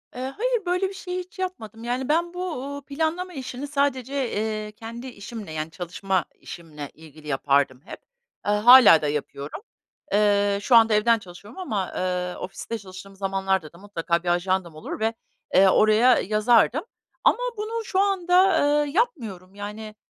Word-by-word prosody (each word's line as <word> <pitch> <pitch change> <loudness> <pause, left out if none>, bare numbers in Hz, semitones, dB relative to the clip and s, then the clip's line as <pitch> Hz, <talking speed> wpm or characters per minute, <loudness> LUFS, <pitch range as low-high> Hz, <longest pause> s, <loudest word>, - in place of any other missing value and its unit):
Eee, 250 - -5 0.2
hayır, 480 -3 0
böyle 365 +2 0
bir - - -9
şey 365 -1 -5
hiç 365 +2 -10
yapmadım, 225 - -5
yani, 250 +3 -2
ben 340 +3 +1
bu, 360 - -7 0.2
uuu, 280 +1 -6
planlama 325 +5 -2
işini 265 0 -6
sadece, 280 -2 -1 0.2
eee, 215 0 -3
kendi 230 +4 -9
işimle, 215 -5 -8
yani, 155 +1 -4
çalışma 185 +2 -2
işimle 150 -4 -9
ilgili 155 -1 -15
yapardım 140 -2 +1
hep. - - -9 0.5
Eee, 205 - +1
hâlâ 220 -6 +8
da 150 - -1
yapıyorum. 145 - -4 0.5
Eee, 205 -1 +3
şu 245 - +3
anda 225 -1 +6
evden 230 +2 +4
çalışıyorum 200 - -13
ama, 210 - -2
eee, 180 -1 -2
ofiste 210 +4 -6
çalıştığım 195 0 -12
zamanlarda 190 -4 -1
da - - -15
mutlaka 170 -3 -2
bir - - -8
ajandam 175 -1 0
olur 155 - -7
ve, 225 +1 0 0.4
eee, 190 0 +6
oraya 215 +5 +5
yazardım 230 - +3 0.4
ama - - +4 0.2
bunu 445 +2 -3
şu 380 - -1
anda, 375 -1 +3 0.3
eee, 285 - -5
yapmıyorum, 220 - -2
yani, 210 +1 -7
215 Hz, 160 wpm, -24 LUFS, 185-280 Hz, 0.5 s, hâlâ